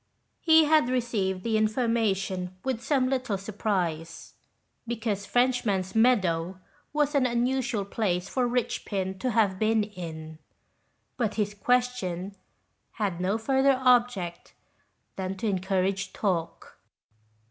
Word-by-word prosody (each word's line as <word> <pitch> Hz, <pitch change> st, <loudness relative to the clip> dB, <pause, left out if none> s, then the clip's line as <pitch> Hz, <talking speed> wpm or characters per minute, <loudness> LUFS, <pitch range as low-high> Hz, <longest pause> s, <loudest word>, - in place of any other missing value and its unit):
He 320 Hz, -1 st, +6 dB
had 305 Hz, -4 st, +4 dB
received 215 Hz, -7 st, -1 dB
the 220 Hz, -2 st, +1 dB
information 210 Hz, -5 st, 0 dB
with 260 Hz, -4 st, -2 dB
some 260 Hz, 0 st, +1 dB
little 255 Hz, -6 st, -1 dB
surprise, 180 Hz, -5 st, -3 dB, 0.5 s
because 220 Hz, -4 st, -3 dB
Frenchnaan's 230 Hz, -7 st, +1 dB
Meadow 185 Hz, -7 st, +2 dB, 0.3 s
was 295 Hz, 0 st, +1 dB
an 275 Hz, -3 st, +3 dB
unusual 245 Hz, -3 st, 0 dB
place 190 Hz, -3 st, -1 dB
for 250 Hz, +2 st, 0 dB
Richpin 195 Hz, -6 st, -2 dB
to 255 Hz, -, -1 dB
have 210 Hz, -5 st, +2 dB
been 220 Hz, 0 st, +2 dB
in, 160 Hz, -6 st, -8 dB, 0.8 s
but 225 Hz, -5 st, -1 dB
his 205 Hz, -1 st, -1 dB
question 205 Hz, -6 st, -1 dB, 0.6 s
had 195 Hz, -6 st, -2 dB
no 195 Hz, +4 st, +1 dB
further 265 Hz, +3 st, +2 dB
object 245 Hz, -9 st, +1 dB, 0.6 s
than 190 Hz, 0 st, -3 dB
to 225 Hz, -, -2 dB
encourage 190 Hz, 0 st, -1 dB
talk. 175 Hz, -5 st, -3 dB
215 Hz, 115 wpm, -27 LUFS, 190-245 Hz, 0.8 s, He